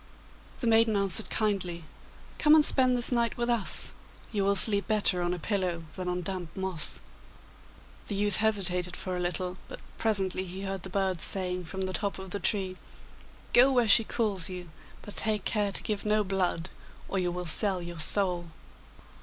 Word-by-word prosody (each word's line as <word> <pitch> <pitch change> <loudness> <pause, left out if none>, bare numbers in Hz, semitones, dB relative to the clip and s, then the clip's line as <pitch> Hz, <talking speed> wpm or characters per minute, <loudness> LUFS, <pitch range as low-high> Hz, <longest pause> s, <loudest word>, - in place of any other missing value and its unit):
The - - -3
maiden 225 -1 +3
answered 195 -3 +1
kindly, 185 -6 -1 0.6
'Come 305 -1 +5
and 305 -1 +4
spend 255 -2 +2
this 240 - -2
night 235 -1 -1
with 240 0 -1
us. 230 -5 +1 0.4
You 205 -3 -1
will 200 +1 +1
sleep 200 0 +3
better 205 -4 +1
on 175 0 -1
a 180 - -3
pillow 180 -2 -3
than 185 -1 -6
on 180 0 -3
damp 180 -1 -4
moss.' 190 -5 -1 1.1
The 205 - -4
youth 205 0 +3
hesitated 180 -5 +1
for 185 -1 -5
a - - -4
little, 180 +1 -2
but - - -9 0.2
presently 195 -4 -1
he 185 +2 -8
heard 195 -1 -5
the 190 - -9
birds 190 -3 -1
saying 180 -2 +7
from 190 +4 -7
the 185 0 -3
top 200 +2 -3
of 190 -1 -10
the 200 - -3
tree, 190 -1 -2 0.8
'Go 255 +3 +6
where 245 -3 +2
she 225 +2 +6
calls 205 -6 -1
you, 180 -3 -9 0.3
but 205 - -10
take 215 -3 0
care 205 -2 0
to - - -1
give 210 -2 -4
no 210 0 +1
blood, 185 -3 -2 0.4
or 195 - -2
you 180 -1 -1
will 180 0 -5
sell 190 +3 +5
your 175 -1 -8
soul. 180 0 0
195 Hz, 185 wpm, -28 LUFS, 180-210 Hz, 1.1 s, saying